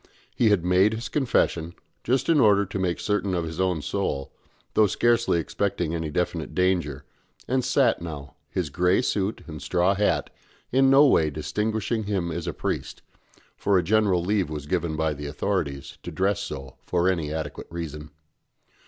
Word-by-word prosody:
He 115 - +4
had 95 -5 +2
made 95 +4 +4
his 110 -1 -5
confession, 85 - 0 0.3
just 130 +2 +1
in 165 -3 +4
order 100 -4 +5
to 95 0 -5
make 90 -2 -1
certain 100 -2 0
of 85 - 0
his 80 +2 -4
own 90 -5 0
soul, 70 -1 -2 0.4
though 110 -1 +5
scarcely 115 -2 +2
expecting 90 -1 -2
any 80 -2 -2
definite 85 0 -2
danger, 85 -7 0 0.4
and 130 0 +1
sat - - +2
now, 75 -5 -7 0.2
his 85 -6 -2
grey 90 - +2
suit 100 -2 -1
and 75 -3 -8
straw 90 +5 +2
hat 95 -7 0 0.4
in 135 +1 +4
no 140 +2 +7
way 80 - +4
distinguishing 105 - -2
him 95 -5 -1
as 85 +2 -4
a - - 0
priest - - -4 0.5
(for 100 -1 +2
a 90 - +2
general 100 -2 +2
leave 100 -4 +1
was 75 -2 -5
given 85 -1 -1
by 80 -1 0
the 75 0 -6
authorities 70 -3 -3
to - - -7
dress 95 +1 0
so 70 -3 -7
for 90 0 +1
any 85 -5 0
adequate 75 -2 -5
reason). 75 -3 -6
90 Hz, 170 wpm, -25 LUFS, 80-105 Hz, 0.5 s, no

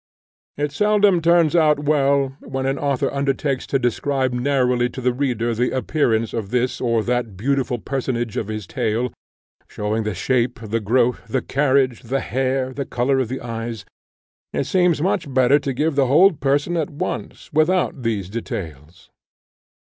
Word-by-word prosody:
It 145 0 -1
seldom 205 +1 +3
turns 170 -1 +4
out 150 -3 +4
well, 140 -2 +2
when 135 0 -4
an 135 +1 -1
author 140 -2 0
undertakes 140 0 -1
to 135 - +1
describe 130 +1 0
narrowly 125 -1 +1
to 125 - -8
the 125 -1 +1
reader 120 -3 -1
the 125 +3 0
appearance 120 -4 0
of 110 -4 -3
this 125 +1 -1
or 115 -3 +1
that 120 -5 -2
beautiful 130 +2 0
personage 120 -3 -3
of 105 - -2
his 110 -2 -5
tale, 115 +6 -1 0.5
showing 105 +2 -2
the 105 -2 -3
shape, 120 +5 0
the 115 0 -2
growth, 120 +3 +1
the 130 -2 -1
carriage, 135 -3 +1
the 130 +4 -2
hair, 130 +1 -1
the 140 - -3
colour 130 +2 +1
of 130 - 0
the 130 +3 -5
eyes; 115 -2 -5 0.7
it - - 0
seems 180 -4 +2
much 170 -5 -1
better 130 +2 +4
to 140 -1 -3
give 150 +5 0
the 140 -2 +3
whole 170 +9 +6
person 145 +4 0
at 155 -3 -1
once, 145 - -5
without 160 -1 +2
these 110 -6 -2
details. 85 -6 -7
130 Hz, 165 wpm, -21 LUFS, 115-145 Hz, 0.7 s, whole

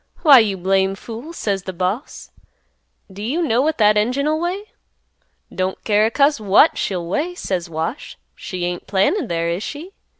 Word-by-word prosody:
'Why 285 -6 +9
you 205 -4 +1
blame 190 +1 +1
fool,' 230 - -9
says 200 - -2
the 190 0 -7
boss; 185 - -4 0.8
'do 200 - -9
you 255 +10 -2
know 245 -5 +2
what 310 +2 0
that 210 -1 +4
engine'll 280 +8 +1
weigh?" 360 +4 -2 0.9
"'Don't 185 0 -3
care 210 0 +3
a - - 0
cuss 280 +2 +2
what 210 +9 +4
she'll 180 -3 -2
weigh,' 305 - -2
says 180 - -3
Wash. 165 - -5 0.2
'She 180 -2 -5
ain't 175 0 -5
planted 220 - +1
there, 170 -1 -1
is 175 +3 -3
she? 315 - -7
210 Hz, 170 wpm, -20 LUFS, 190-290 Hz, 0.9 s, Why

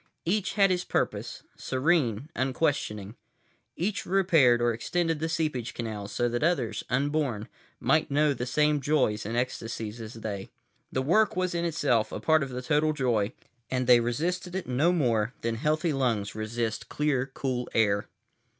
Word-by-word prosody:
Each 195 +3 0
had 195 -2 +4
his 180 0 0
purpose, - - -2
serene, 130 -4 +1
unquestioning. 130 -6 -1 0.6
Each 190 +4 -1
repaired 165 -11 +4
or 120 0 +2
extended 165 +7 -1
the 160 +1 -1
seepage 155 -8 -2
canals 105 -3 -5
so 120 - 0
that 120 0 -2
others, 130 - 0
unborn, 135 -4 0 0.3
might 155 0 +2
know 145 +1 +3
the 125 -1 -4
same 150 +2 +2
joys 130 -8 +1
and 115 +2 -2
ecstasies 115 -2 -3
as 110 +1 -8
they. 105 -3 -5 0.4
The 130 - -1
work 205 +9 +3
was 185 -1 0
in 170 0 -1
itself 145 -9 +1
a - - -4
part 160 -1 +3
of 140 - -2
the 125 0 -5
total 150 +3 +2
joy, 120 -8 0 0.4
and 130 -1 0
they 125 -1 +7
resisted 175 +10 -2
it 190 - -2
no 135 +7 +2
more 120 -8 +1
than 115 0 -1
healthy 155 +7 0
lungs 115 -7 0
resist 110 +1 -3
clear, 140 -3 0
cool 125 -2 -2
air. 100 -2 +2
130 Hz, 160 wpm, -28 LUFS, 115-160 Hz, 0.6 s, they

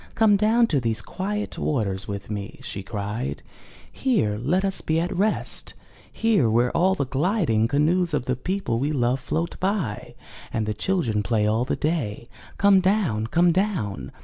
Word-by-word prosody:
come 220 -2 +5
down 220 +4 +4
to 150 -10 +1
these 115 -2 -1
quiet 205 - -4
waters 100 -9 -1
with 100 +1 -6
me!'* 105 +2 -5
she 135 -7 -5
cried. 100 - -4 0.5
Here 215 - +1
let 180 +10 +1
us 195 -1 -1
be 160 +1 0
at 175 +2 -2
rest 205 +4 -1 0.2
— - - -27 0.2
here 215 - +2
where 120 +2 +2
the 180 -3 +2
gHding 135 - +1
canoes 165 +5 +2
of 130 - -2
the 130 - 0
people 180 -5 -2
we 145 +4 0
love 125 -2 +1
float 160 +5 -3
by, 185 - -2 0.4
and 110 - -1
the 105 - -1
children 115 - 0
play 105 +1 +1
all 110 +3 +1
the - - -1
day. 130 -8 -2 0.3
Come 200 -1 +5
down! 185 - +1
Come 170 +7 +3
down!'' 175 - -1
140 Hz, 170 wpm, -24 LUFS, -, 0.5 s, come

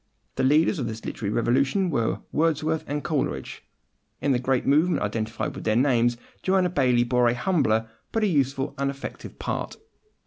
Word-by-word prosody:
The - - 0
leaders 155 +6 +3
of 125 - -2
this 110 0 -6
literary 105 -2 -3
revolution 135 - +1
were 115 -6 0
Wordsworth 155 0 +1
and 145 +1 -3
Coleridge. 150 -5 -2 0.6
In 140 - +1
the 125 - +2
great 130 0 0
movement 155 +6 +3
identified 110 +2 -2
with - - -8
their 110 - +1
names 120 -2 +3 0.2
Joanna 185 -2 +2
Baillie 125 -7 +3
bore 125 0 +3
a 120 - +2
humbler, 120 - +1 0.2
but 225 - 0
a - - +4
useful 135 -5 0
and 140 0 +1
effective 140 0 -7
part. - - -4
135 Hz, 170 wpm, -25 LUFS, 120-155 Hz, 0.6 s, a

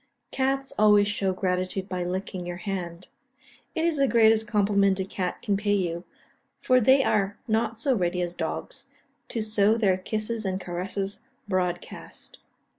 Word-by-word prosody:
Cats 270 0 0
always 210 -1 +6
show 200 -2 0
gratitude 185 0 -2
by 185 -2 -3
licking 185 0 -4
your 175 0 -5
hand; 180 -2 -5 0.7
it 325 0 +1
is 335 -3 +1
the 275 -1 +3
greatest 220 -2 +4
compliment 200 -2 +2
a 190 - -1
cat 185 -1 -4
can 200 - +1
pay 205 +1 +1
you, 175 -3 -2 0.6
for 255 0 +3
they 265 +4 +5
are 205 -2 +1
not 225 0 0
so 265 +1 +2
ready 180 -3 0
as 175 0 -3
dogs, - - -5 0.4
to 225 - -2
sow 215 0 +3
their 195 -5 +3
kisses 215 +3 -2
and 190 -1 -2
caresses 195 +2 -4 0.3
broad 180 -3 0
cast. - - -11
200 Hz, 160 wpm, -26 LUFS, 185-220 Hz, 0.7 s, always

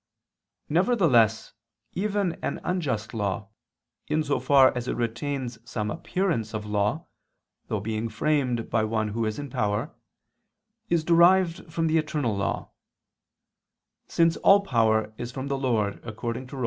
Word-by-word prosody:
Nevertheless 155 - +3 0.4
even 200 -2 0
an - - -2
unjust 130 - -2
law, 100 -2 -2 0.6
in 155 +1 +1
so 145 -1 0
far 135 -2 +5
as 125 0 -4
it - - -1
retains 120 +1 -3
some 105 -2 -3
appearance 165 - -2
of 105 -1 -4
law, 105 0 -1 0.6
though 105 - -1
being 110 +2 -3
framed 125 0 0
by 115 -2 +2
one 110 0 -1
who 115 +2 -2
is 110 - -3
in 145 -3 -6
power, 105 -5 -1 1.0
is 170 -2 +2
derived 170 0 +4
from 165 +1 -1
the 160 0 +3
eternal 150 -8 -1
law; 100 - -3 1.4
since 165 0 +2
all 200 +1 +6
power 110 - +1
is 120 0 -5
from 135 +2 -5
the 140 - 0
Lord 110 -6 0
God, 120 - -8
according 115 +3 -5
to 135 - -9
Rom. - - -5
125 Hz, 150 wpm, -26 LUFS, 110-160 Hz, 1.4 s, all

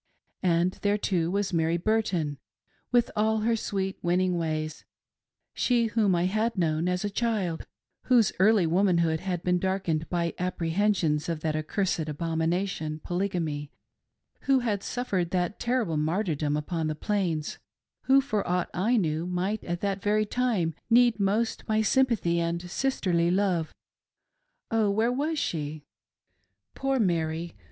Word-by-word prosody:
And 175 0 +1
there, 205 0 +2
too, 175 -5 0
was 200 +1 -1
Mary 165 0 +2
Burton, 175 -7 0 0.5
with 245 -1 +3
all 220 +1 +2
her 230 +1 +2
sweet, 195 -3 -3
winning 180 +1 +1
ways 155 -2 -3 0.4
— - - -65 0.3
she 240 -2 +2
whom 210 -5 +3
I 175 +1 +1
had 215 +4 0
known 165 -1 +1
as 180 +2 -1
a - - 0
child; 205 -7 -1 0.4
whose 240 -5 +4
early 205 -1 +5
womanhood 170 -2 +2
had 180 -1 -3
been 180 0 +2
darkened 180 -4 -1
by 170 -1 0
appre 180 -2 -2
hensions 175 -6 +1
of 165 -2 -2
that 155 -1 -1
accursed 155 0 -1
abomination 160 +1 -2
— - - -41
Polygamy; 170 -6 -2 0.7
who 270 -2 +4
had 210 -5 -1
suffered 195 -9 -2
that 180 +2 -1
terrible 235 -10 0
martyrdom 155 -2 0
upon 160 +1 -2
the 155 - -2
Plains; 170 -4 -2 0.5
who, 270 +1 +6
for 215 -7 -1
aught 180 0 0
I 220 +7 +2
knew, 160 -3 0
might 185 +4 -2
at 175 0 -3
that 200 -1 -1
very 215 +1 +2
time 210 -8 0 0.2
need 240 -2 +5
most 205 +4 0
my 215 0 +2
sympathy 225 -9 +2
and 170 0 -1
sisterly 180 -11 +1
love— 180 -4 +1 1.0
Oh, 220 -2 +2
where 220 +4 +2
was 300 +5 -1
she 155 - -3 0.4
.' 100 +1 -49
Poor 270 0 0
Mary 170 -5 0
180 Hz, 150 wpm, -27 LUFS, 165-215 Hz, 1.0 s, who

